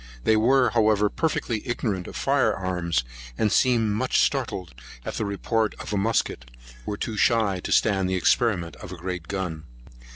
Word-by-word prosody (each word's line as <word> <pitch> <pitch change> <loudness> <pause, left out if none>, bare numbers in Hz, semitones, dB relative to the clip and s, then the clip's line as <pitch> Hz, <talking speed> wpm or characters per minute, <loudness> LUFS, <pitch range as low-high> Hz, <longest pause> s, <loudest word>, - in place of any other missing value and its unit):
They 110 - +4
were, 125 +4 +4
however, 105 -2 +3
perfectly 120 -9 -1
ignorant 110 -7 -2
of - - -9
fire - - +2
arms, 90 -6 -1 0.3
and 105 - +1
seemed 115 -1 +3
much 125 +5 +1
startled 110 - -1 0.3
at - - -4
the 110 - -2
report 110 +2 -1
of - - -6
a - - +1
musket, 100 - -1 0.4
were 105 - -3
too 110 0 -4
shy 105 -6 +2
to - - -6
stand 95 -3 +2
the 95 - 0
experiment 90 -2 +1
of 90 - -10
a 90 - -7
great 90 -1 -5
gun. 90 -6 -4
105 Hz, 170 wpm, -25 LUFS, 90-115 Hz, 0.4 s, They